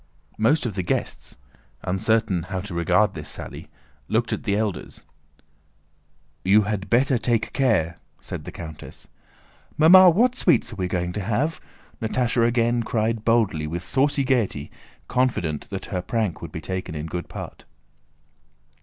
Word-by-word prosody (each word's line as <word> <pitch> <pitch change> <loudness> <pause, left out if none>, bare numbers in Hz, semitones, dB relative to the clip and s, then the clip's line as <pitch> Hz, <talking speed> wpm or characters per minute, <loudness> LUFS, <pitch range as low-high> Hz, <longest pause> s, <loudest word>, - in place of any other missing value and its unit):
Most 140 +8 +3
of 115 - -2
the 95 - -2
guests, 85 - -3 0.5
uncertain 95 0 +1
how 95 -1 -2
to 100 -1 -7
regard 85 -2 +2
this - - -8
sally, - - -8 0.4
looked - - 0
at - - -4
the 100 - +1
elders. 105 -2 -3 1.4
"You 105 +3 +5
had 100 -2 -3
better 125 +2 +3
take 115 -2 0
care!" 95 -11 +1 0.2
said - - -7
the - - -7
countess. 80 -2 -10 0.7
"Mamma! 180 +4 +9
What 240 +9 +3
sweets 170 - +2
are - - -10
we 90 -2 -1
going 90 -1 -2
to 105 - -3
have?" 120 - -1 0.4
Natásha 115 +1 +1
again 120 0 +2
cried 110 -1 -1
boldly, 110 -10 +2
with 85 +3 -4
saucy 140 +7 +2
gaiety, 115 - 0 0.4
confident 105 - -1
that 95 -1 -5
her 90 - 0
prank 105 -6 -2
would 85 - -7
be 80 - -6
taken 90 -2 -4
in 75 0 -4
good 85 +2 -5
part. - - -8
110 Hz, 150 wpm, -24 LUFS, 90-120 Hz, 1.4 s, Mamma